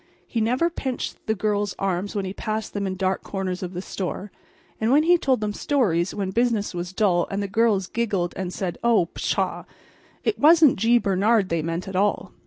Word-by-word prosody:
He 230 - -2
never 255 +10 +1
pinched 260 -6 -4
the 220 - +1
girls' 205 0 -1
arms 195 +2 -2
when 200 -2 -1
he 185 - -4
passed 215 0 -4
them 200 -1 -2
in 185 - -3
dark 190 0 -1
corners 190 -2 -4
of 180 -1 -5
the 180 - -4
store; 195 +1 -5 0.5
and 220 +2 +2
when 295 +3 +5
he 350 +2 +5
told 265 -8 +1
them 210 -1 -1
stories 195 - +1
when 195 -2 -2
business 230 -2 0
was 175 0 -4
dull 190 -3 +2
and 195 - -2
the - - -2
girls 205 -1 +2
giggled 200 -5 -1
and 185 -2 -4
said: 185 -2 -4
"Oh, 225 -8 +3
pshaw!" - - -1 0.6
it - - 0
wasn't 315 -2 +6
G. 230 +4 +4
Bernard 200 -1 +2
they 165 -1 0
meant 165 +3 -3
at 190 - -6
all. 205 +2 0
205 Hz, 200 wpm, -24 LUFS, 185-230 Hz, 0.6 s, wasn't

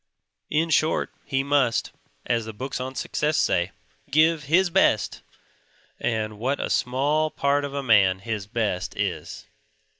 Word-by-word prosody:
In 160 +2 +1
short, 155 +1 +2
he 135 0 0
must 140 -4 +1 0.3
(as 115 -2 0
the 110 - -7
books 130 +4 -5
on 130 +1 -5
Success 150 +3 -1
say) 85 +2 +1 0.4
give 155 +1 +3
"his 175 +5 +3
best"; 165 - +2 0.8
and 110 -2 -2
what 135 +5 -1
a - - -2
small 145 +5 +1
part 140 -1 +1
of 140 0 -5
a 140 - -2
man 100 -6 +4
"his 105 0 -4
best" 105 -5 -2
is! - - -3
135 Hz, 145 wpm, -24 LUFS, 110-150 Hz, 0.8 s, man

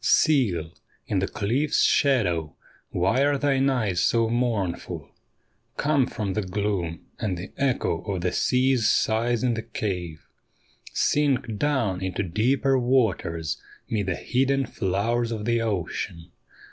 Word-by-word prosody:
' - - -27 0.2
Seal, 105 - +1 0.3
in 100 - 0
the 95 - 0
cliff's 130 +9 +1
shadow, 90 - +2 0.3
why 95 +10 +2
are 145 0 +2
thine 135 -1 +2
eyes 105 -9 0
so 115 -1 +3
mournful? 115 -7 -2 0.7
Come 145 -3 +2
from 105 -7 -3
the 105 - 0
gloom 95 -4 -2
and 95 -5 -2
the 90 +3 -7
echo 135 -3 0
of 95 -3 -2
the 90 0 0
sea's 125 -3 +2
sighs 115 +2 +1
in 125 -2 +2
the 110 - -2
cave, 90 -8 -4 0.7
Sink 135 -6 +1
down 115 -11 0
into 95 +1 -2
deeper 130 +8 +2
waters 110 - 0 0.3
'mid 105 -3 -1
the 95 - 0
hidden 135 +4 +1
flowers 115 +4 -1
of 110 -2 -4
the 115 0 +1
ocean. 90 -5 -3
110 Hz, 135 wpm, -25 LUFS, 95-130 Hz, 0.7 s, so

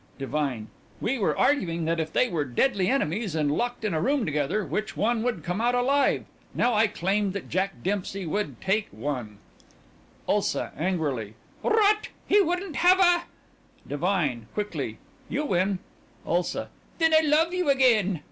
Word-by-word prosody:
DIVINE: 135 -5 -2 0.3
We 255 +2 -1
were 200 - +1
arguing 170 - +1
that 165 +1 0
if 160 -1 -2
they 250 - +3
were 165 -9 -1
deadly 185 - +1
enemies 210 - 0
and 150 -2 +1
locked 240 +7 -2
in 210 - 0
a 155 - 0
room 275 - +1
together 150 +7 -1
which 210 +8 -3
one 230 +1 +1
would 225 -9 -2
come 180 +6 -2
out 245 +1 +2
alive. 275 +3 +2 0.3
Now 245 0 +2
I 220 +1 +4
claimed 195 +1 0
that 200 - -6
Jack 190 +3 -1
Dempsey 195 0 -2
would 205 +6 -3
take 205 +2 +1
one 115 -3 -5 0.9
ULSA: - - 0
(Angrily) 145 - -2 0.3
Rot! 425 -1 +3 0.2
He 410 - +5
wouldn't 355 -3 -2
have 365 +2 +5
a 350 -2 +4 0.6
DIVINE: 145 - -1
(Quickly) 155 - -3 0.3
You 295 +4 -1
win. 190 -4 +1 0.5
ULSA: 175 +1 -1 0.3
Then 325 -1 +3
I 315 - +7
love 320 +3 +2
you 360 -4 0
again. 225 - +3
200 Hz, 155 wpm, -26 LUFS, 160-265 Hz, 0.9 s, I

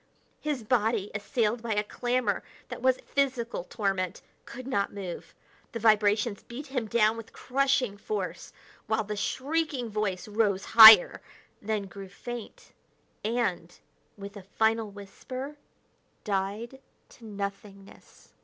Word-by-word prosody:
His 295 -6 -3
body, 220 -2 0
assailed 215 +2 -1
by 225 -2 -2
a 210 - +1
clamor 240 -1 -1 0.3
that - - -7
was 260 0 +3
physical 255 -8 -1
torment, 195 -3 -2 0.2
could 255 +1 -9
not 200 -7 -1
move; 190 -4 -7 0.4
the 230 - -3
vibrations 215 -1 +3
beat 255 +5 -9
him 255 -5 -3
down 220 0 +2
with 230 - -10
crushing 265 -4 0
force, 425 - -4 0.4
while 220 0 +1
the 210 0 -5
shrieking 270 +1 -2
voice 205 -3 -2
rose 205 -2 0
higher, 220 -4 +9 0.4
then 215 -1 -2
grew 195 0 -10
faint, 240 - -9 0.5
and, 205 -7 -2 0.4
with 200 0 -9
a 200 - -8
final 220 +3 0
whisper, 255 +8 -8 0.7
died 210 +5 -3 0.3
to 240 - -18
nothingness. 200 -1 -9
220 Hz, 125 wpm, -28 LUFS, 200-245 Hz, 0.7 s, higher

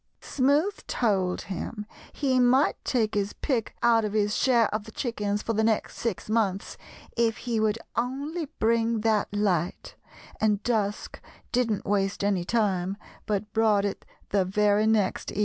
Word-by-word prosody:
"Smoothe 290 +9 +1
told 190 -6 0
him 210 +3 -5 0.3
he 265 -3 +1
might 250 +3 +3
take 225 -4 0
his 205 -1 -1
pick 245 -7 -2
out 230 -1 +4
of 210 -1 -2
his 210 -1 +1
share 240 -3 +4
of 215 0 -2
the 220 - -10
chickens 210 -4 -2
for 230 - -1
the 220 0 +1
next 220 -1 0
six 230 -6 -3
months 210 -3 0 0.4
if 230 -2 +1
he 235 -3 -2
would 215 0 +1 0.2
only 280 +8 -2
bring 230 0 +1
that 215 -1 +2
light, 190 -5 -1 0.5
and 210 -1 +1
Dusk 210 -4 -2 0.3
didn't 230 -5 0
waste 195 -1 0
any 200 -3 +1
time, 195 -2 0 0.3
but 210 0 -2
brought 215 -2 +3
it 200 - -3 0.3
the 195 -1 +2
very 210 +3 +2
next 215 -3 +1
evening." - - -4
215 Hz, 155 wpm, -27 LUFS, 205-235 Hz, 0.5 s, out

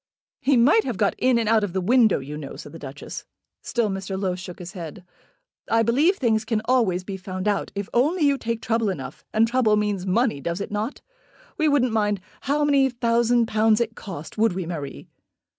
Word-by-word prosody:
"He 275 -2 +3
might 290 - +5
have 245 -6 -3
got 200 0 +2
in 255 -1 +3
and 230 -2 0
out 220 -1 +4
of 195 -4 -3
the 190 - 0
window, 225 +2 +4
you 140 +2 -7
know," 145 -2 -7
said 145 - -10
the 165 - -10
Duchess. 140 -1 -8 0.4
Still 235 -3 0
Mr. 195 -1 -4
Low 190 -2 0
shook 180 -1 -8
his 175 0 -8
head. 180 -1 -8 0.6
"I 225 0 +3
believe 295 - +3
things 225 -4 +1
can 220 -1 0
always 225 -8 +2
be 195 0 -5
found 185 +1 -5
out, 205 -1 0
if 200 0 -3
only 305 +8 +2
you 280 -2 +3
take 230 0 -3
trouble 225 -2 +1
enough. 190 - -6
And 220 +1 +3
trouble 235 -3 +3
means 205 -3 -1
money; 220 - +1
does 170 +4 -3
it 200 - -5
not? 215 +5 -3 0.6
We 310 - +3
wouldn't 260 -5 +2
mind 210 -2 +1 0.3
how 295 +1 +2
many 275 -2 +4
thousand 235 -1 +2
pounds 220 -1 +3
it 230 -1 -1
cost; 175 0 -8
would 225 -3 +3
we, 185 -1 -3
Marie?" 150 -5 -6
220 Hz, 210 wpm, -24 LUFS, 185-240 Hz, 0.6 s, might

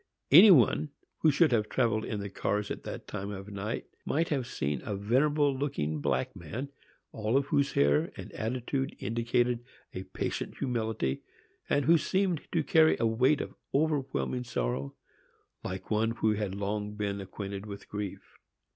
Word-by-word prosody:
Any 180 +10 +10
one 155 - +5 0.3
who 160 - +4
should 155 +1 +4
have 110 -3 +1
travelled 115 -4 +1
in 105 -2 -3
the 100 - -5
cars 105 +1 -1
at - - -4
that - - -6
time 100 -1 -5 0.7
might 160 +3 0
have 135 -5 -1
seen 70 - -2
a 105 - -3
venerable 140 +7 +2
looking 80 - -2
black - - -1
man, 130 +6 -6 0.4
all 110 +5 +1
whose 140 0 0
air 70 +1 +3
and - - -8
attitude 130 +4 -2
indicated 120 +1 0 0.3
a 95 - -4
patient - - -4
humility, 110 - -1 0.5
and 145 -1 +2
who 165 +1 +6
seemed 185 -2 0
to 165 -2 +1
carry 160 +1 +5
a - - +2
weight 130 +6 +3
of - - -6 0.2
overwhelming 140 -4 0
sorrow, 65 - -2 0.7
like 95 +2 -6
one 110 +1 +2
who 110 -2 +1
had 100 -2 -2
long 105 +1 -3
been 100 -1 -2
acquainted 100 +1 -6
with 100 -1 -8
grief. 105 -2 -6
115 Hz, 155 wpm, -30 LUFS, 100-140 Hz, 0.7 s, Any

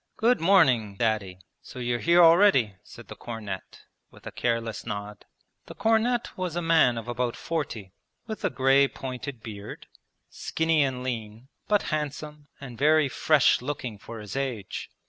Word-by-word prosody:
'Good 235 -1 +2
morning. 135 - +4
Daddy. 100 -4 -1 0.2
So - - -13
you're 120 -1 -1
here 170 +4 +5
already,' 165 - +5
said - - -14
the - - -9
cornet, 105 -5 -7 0.3
with - - -19
a - - -6
careless 115 -2 -2
nod. 105 0 -7 0.4
The - - -10
cornet 225 +2 +1
was 180 -3 -4
a 175 - -1
man 160 -8 +4
of 115 - -6
about 120 0 -2
forty, 120 - -4 0.3
with 220 -2 -7
a - - +2
grey 135 +1 +3
pointed 130 -2 -7
beard, 105 -2 -9 0.4
skinny 160 -1 0
and 130 -2 -1
lean, 115 0 -6 0.2
but 210 -1 +2
handsome 150 0 -5
and 125 -4 -10
very 150 0 +4
fresh 150 -1 +3
looking 125 -5 -5
for 115 +2 -9
his 105 +2 -8
age. 130 -8 -4
130 Hz, 155 wpm, -26 LUFS, 115-160 Hz, 0.4 s, here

